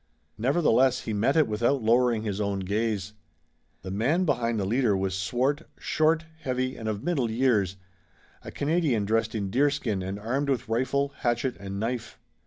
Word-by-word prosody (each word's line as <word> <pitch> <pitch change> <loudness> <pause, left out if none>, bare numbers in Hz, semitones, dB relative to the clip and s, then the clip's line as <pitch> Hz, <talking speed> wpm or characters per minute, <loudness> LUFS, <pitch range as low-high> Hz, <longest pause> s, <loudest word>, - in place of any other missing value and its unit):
Nevertheless 130 -1 +3
he 110 - -4
met 115 +7 +2
it 155 - +5
without 115 +4 +1
lowering 120 0 +3
his 105 -1 -2
own 100 -1 -1
gaze. 105 +1 -1 0.7
The 95 - -5
man 140 - +1
behind 120 -7 0
the 100 - -1
leader 110 -1 +2
was 95 0 -1
swart, 125 - 0 0.2
short, 160 +1 +1
heavy 130 -2 -2
and 110 -1 -4
of 105 0 -3
middle 140 -10 0
years, 110 -6 +2 0.7
a - - -8
Canadian 145 -8 0
dressed 110 +1 0
in 100 -3 -2
deerskin 130 -5 +1
and 95 +2 -4
armed 130 +7 -2
with 130 -6 0
rifle, 130 +5 0
hatchet 120 +2 0
and 100 0 -5
knife. 115 +1 -3
115 Hz, 165 wpm, -27 LUFS, 105-135 Hz, 0.7 s, it